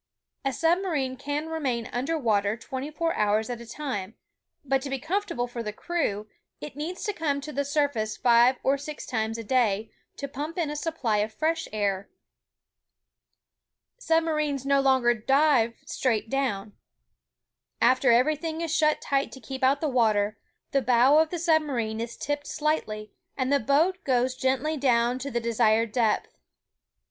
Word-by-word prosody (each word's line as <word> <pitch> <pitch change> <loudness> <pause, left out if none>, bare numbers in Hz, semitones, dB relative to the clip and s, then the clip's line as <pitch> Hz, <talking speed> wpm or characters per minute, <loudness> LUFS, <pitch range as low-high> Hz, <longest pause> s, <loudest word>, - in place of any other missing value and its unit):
A 270 - 0
submarine 325 -3 0
can 290 +3 -3
remain 265 -8 -2
under 270 +7 -1
water 215 -5 +1
twenty 260 +4 -5
four 330 +2 -1
hours 215 +2 +1
at 235 -1 -5
a 235 - -11
time, 230 -7 -5 0.5
but 270 0 +1
to 275 - -5
be 270 - -1
comfortable 315 -3 -2
for 245 -1 -6
the 210 -2 -4
crew, 215 -6 -2 0.3
it 295 - -8
needs 320 +5 -5
to 415 - -1
come 295 -5 -1
to 300 +2 -7
the 285 - 0
sur 285 +1 +2
face 215 -6 -4
five 240 +1 +5
or 275 +1 +2
six 295 +1 -7
times 220 -1 -2
a 230 - -5
day, 220 -3 +1 0.3
to 280 - -4
pmnp 295 +5 -6
in 330 -4 0
a - - -4
supply 295 -9 -1
of 210 +1 0
fresh 320 +8 -1
air. 200 -2 -1 1.9
Submarines 305 - 0
no 275 0 +3
longer 260 -3 +4
dive 255 0 +2
straight 225 -6 -1
down. 215 -7 -1 1.1
After 255 +1 +4
every 255 +6 +4
thing 320 +2 -4
is 325 -1 -1
shut 305 -1 +2
tight 275 0 0
to 265 - -9
keep 265 +3 -7
out 275 +2 +3
the 315 - +1
water, 215 -5 +2 0.4
the 275 - +2
bow 255 +4 +5
of 320 0 +3
the 350 - -3
submarine 290 -10 0
is 230 0 -6
tipped 290 0 -3
slightly, 215 -9 -2 0.3
and 260 0 0
the 280 - +4
boat 315 +10 +2
gUdes 255 -1 +1
gently 265 +4 0
down 245 -2 +2
to 275 +2 -4
the 240 -3 -1
desired 230 -1 +2
depth. 225 -2 0
265 Hz, 170 wpm, -26 LUFS, 230-300 Hz, 1.9 s, five